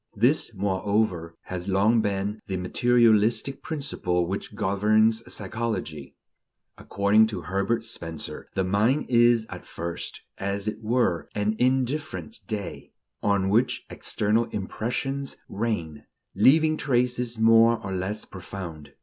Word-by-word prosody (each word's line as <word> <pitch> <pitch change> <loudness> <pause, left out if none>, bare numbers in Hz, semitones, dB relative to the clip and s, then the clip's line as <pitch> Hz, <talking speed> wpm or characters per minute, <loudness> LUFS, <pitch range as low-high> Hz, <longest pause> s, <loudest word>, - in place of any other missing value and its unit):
This, 120 +6 +2
moreover, 95 -3 -1
has 90 0 -6
long 105 +4 +3
been 100 +1 -2
the 95 - -2
materialistic 115 +5 +2
principle 90 - -1
which 100 +3 -5
governs 110 +3 +2
psychology. 100 -9 -4 0.6
According 100 +2 +3
to 110 - -5
Herbert 100 +5 -1
Spencer, 85 -8 -5
the 95 - +1
mind 105 +10 +2
is 120 -2 +4
at - - -7
first, 85 0 -6 0.2
as 100 +1 -2
it 110 +1 -3
were, 110 -6 0
an 105 +1 0
indifferent 135 - -1
day, 105 -5 -6 0.3
on 100 -2 +1
which 120 +5 +1
external 110 +3 +1
impressions 120 +6 -3
"rain," 85 -9 -3 0.3
leaving 155 +2 +4
traces 125 -3 0
more 115 +1 +5
or 95 - -3
less 95 +3 -3
profound. 90 -5 -8
105 Hz, 115 wpm, -26 LUFS, 95-120 Hz, 0.6 s, more